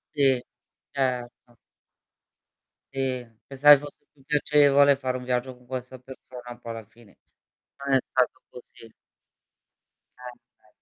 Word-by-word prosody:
Sì. 135 -4 +3 0.5
Certo. 125 -3 -3 1.4
Sì. 130 -2 -2 0.2
Pensavi 145 +1 +7
fosse 145 0 -12
più 135 - -24
piacevole 145 -1 +4
fare 130 -2 -3
un 125 - -9
viaggio 125 +1 -2
con 125 0 -23
questa 130 0 -6
persona, 125 -1 -11
poi 115 - -7
alla 115 -1 -8
fine 115 -1 -21 0.7
non 140 - +2
è - - +6
stato 130 -1 -1
così. 115 -2 -14 1.3
Sempre. 125 -1 -14
130 Hz, 115 wpm, -26 LUFS, 125-135 Hz, 1.4 s, Pensavi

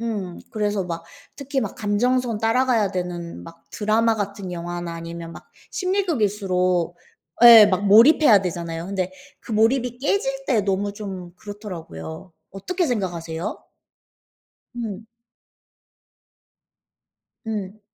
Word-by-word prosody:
음. 205 -6 -4
그래서 210 -3 -1
막 170 -1 -5 0.3
특히 280 -1 -2
막 - - -4
감정선 235 +2 0
따라가야 225 -2 +2
되는 175 -2 -5
막 165 0 -14
드라마 225 +2 +2
같은 200 -3 -4
영화나 175 0 -5
아니면 165 0 -7
막 - - -13 0.2
심리극일수록 200 - 0 0.5
예. 230 -3 +11
막 200 0 0
몰입해야 225 - +7
되잖아요. 170 -1 -4
근데 190 -2 -2 0.3
그 - - -13
몰입이 240 +3 +2
깨질 - - -1
때 225 - +3
너무 200 +1 -1
좀 190 -4 -7
그렇더라고요. 175 - -8 0.2
어떻게 350 - -2
생각하세요? 175 - -3 1.1
음. 220 -2 -5 2.4
음. 210 -2 -4
205 Hz, 250 characters per minute, -23 LUFS, 180-230 Hz, 2.4 s, 예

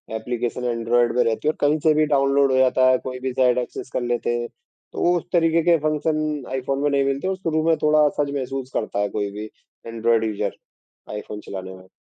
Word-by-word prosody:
Application 120 +2 -3
Android 120 +1 +1
में 125 - +5
रहती 115 +5 -1
हैं 155 - +5
और - - -27
कहीं 150 +2 +2
से 155 - +5
भी 155 0 +3
डाउनलोड 140 -1 +3
हो 130 - +2
जाता 130 0 +4
है, 130 - +4
कोई 125 0 -7
भी 130 -1 -3
साइट 125 -1 +3
एक्सेस 125 0 -4
कर - - -1
लेते 120 0 -1
हैं। 120 - -3 0.5
तो 175 +1 +2
उस 170 - -4
तरीके 165 -1 +3
के 170 0 +4
फ़ंक्शन 155 -1 -1
आईफ़ोन 135 +1 -2
में 145 - +3
नहीं 140 -1 +2
मिलते 140 +6 -1
और 190 - 0
शुरू 160 -4 -1
में 165 - +5
थोड़ा 150 0 +5
असहज 145 -1 0
महसूस 135 -1 -4
करता 105 - -2
है 105 0 0
कोई 100 -1 -1
भी 105 +2 -7 0.4
ऐन्ड्रॉइड 115 0 +1
यूज़र 110 -2 -2 0.6
आईफ़ोन 105 0 -6
चलाने 95 -1 -7
में। 95 0 -16
130 Hz, 220 wpm, -22 LUFS, 115-150 Hz, 0.6 s, में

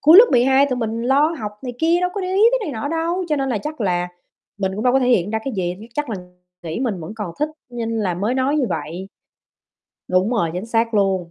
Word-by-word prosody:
cuối 320 +5 +8
lớp 450 - +11
12 265 +3 +5
tụi 255 -2 -1
mình 230 -1 -2
lo 280 +6 +3
học 210 -3 -4
này 250 - -4
kia 335 +2 +3
đâu 360 0 +1
có 405 - -2
để 370 - -3
ý 400 - +3
tới - - +3
này - - -3
nọ 285 - -2
đâu, 335 +3 -1
cho 300 - +1
nên 270 -1 -1
là 235 - 0
chắc 300 +2 -6
là 180 -3 0 0.5
mình 190 -1 -1
cũng 215 +4 -4
đâu 250 - +4
có 270 - +5
thể 250 -2 +1
hiện 205 -5 +3
ra 220 - 0
cái 270 - -3
gì, 175 -1 -1 0.2
chắc 295 -5 -2
là 210 - -2 0.5
nghĩ 165 +7 -4
mình 220 -9 -1
vẫn 165 +5 -7
còn 210 -6 -4
thích 300 - +1 0.2
nên 235 -2 -3
là 185 -4 0
mới 205 +8 -1
nói 265 +3 +1
như 280 -4 +2
vậy. 180 +5 -4 1.0
Đúng 185 +4 +2
rồi, 210 -9 +1
chính 180 +5 -4
xác 230 0 0
luôn. 190 -4 +1
235 Hz, 260 wpm, -21 LUFS, 195-285 Hz, 1.0 s, lớp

